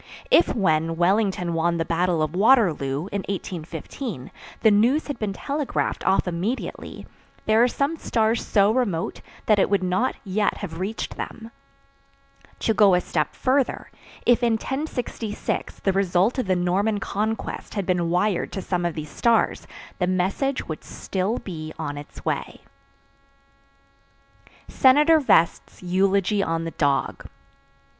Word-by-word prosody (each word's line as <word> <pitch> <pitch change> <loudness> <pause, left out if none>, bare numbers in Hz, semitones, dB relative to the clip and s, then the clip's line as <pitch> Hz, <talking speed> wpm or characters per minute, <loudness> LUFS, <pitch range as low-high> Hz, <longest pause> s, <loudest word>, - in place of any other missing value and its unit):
If, 345 - +5
when 165 -6 +1
Wellington 185 0 +1
won 170 +1 +1
the 165 - -1
battle 170 -1 +1
of 155 +1 -2
Waterloo, 175 - +3
in 200 - -2
1815, 170 - -6 0.3
the 220 - +5
news 240 +9 +3
had 285 -4 -5
been 215 -2 -2
telegraphed 285 +7 -2
off 190 0 +3
immediately, 180 +9 -4 0.4
there 220 +1 +4
are 245 - +6
some 280 +5 -1
stars 225 -4 0
so 200 0 +3
remote 220 -9 -1 0.2
that 215 -2 +4
it - - +3
would 200 -2 +1
not 185 +8 0
yet 205 +1 0
have 165 -5 -6
reached 200 +4 -4
them. 225 0 -7 1.1
To 225 - +2
go 200 -3 +5
a - - +3
step 155 -4 -2
further, 265 0 0 0.3
if 245 0 +4
in 235 -1 +2
1066 245 -3 -4
the 195 - +1
result 195 +5 +2
of 250 - -2
the 185 - +2
Norman 195 +4 +1
Conquest 215 +3 -3
had 200 -3 -1
been 175 -2 0
wired 180 +2 0
to 195 - -3
some 175 -2 -1
of 170 - -5
these 155 -2 -6
stars, 230 -1 +1 0.3
the 180 - +1
message 190 +9 -1
would 155 - -6
still 195 +5 -3
be 155 -4 -7
on 150 -3 -4
its 145 0 -11
way. - - -3 2.1
SENATOR 295 +5 +5
VEST'S 170 - +1
EULOGY 195 +2 +2
ON 165 -3 -1
THE 165 - -4
DOG. 140 -3 -1
195 Hz, 145 wpm, -24 LUFS, 175-225 Hz, 2.1 s, are